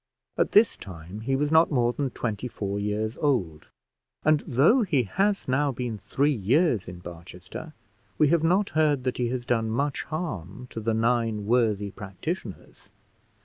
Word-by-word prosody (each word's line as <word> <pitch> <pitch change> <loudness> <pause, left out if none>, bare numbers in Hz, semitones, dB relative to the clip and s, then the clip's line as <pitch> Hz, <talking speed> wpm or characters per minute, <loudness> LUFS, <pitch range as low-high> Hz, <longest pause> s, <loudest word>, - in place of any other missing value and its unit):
At - - 0
this 210 +2 +6
time 90 +1 -9
he 135 +4 0
was 145 +2 0
not 160 +1 +5
more 120 -4 +2
than 140 0 -1
twenty 115 -1 -3
four 100 -3 -4
years 105 +2 -2
old; 95 - 0 0.6
and 155 -1 +5
though 150 - +4
he 155 - +2
has 195 - 0
now 140 +2 +2
been 120 -4 -4
three 140 +10 +1
years 120 - +2
in 90 0 -7
Barchester, 90 - -10 0.4
we 150 - +4
have 170 0 +3
not 185 +5 +2
heard 150 -4 +2
that 130 0 -1
he 120 - +1
has 125 -1 -3
done 115 -2 0
much 140 +5 -1
harm 125 - -5
to - - -5
the 110 0 0
nine 115 -2 +1
worthy 105 -3 +1
practitioners. 105 - -7
120 Hz, 165 wpm, -26 LUFS, 105-150 Hz, 0.6 s, this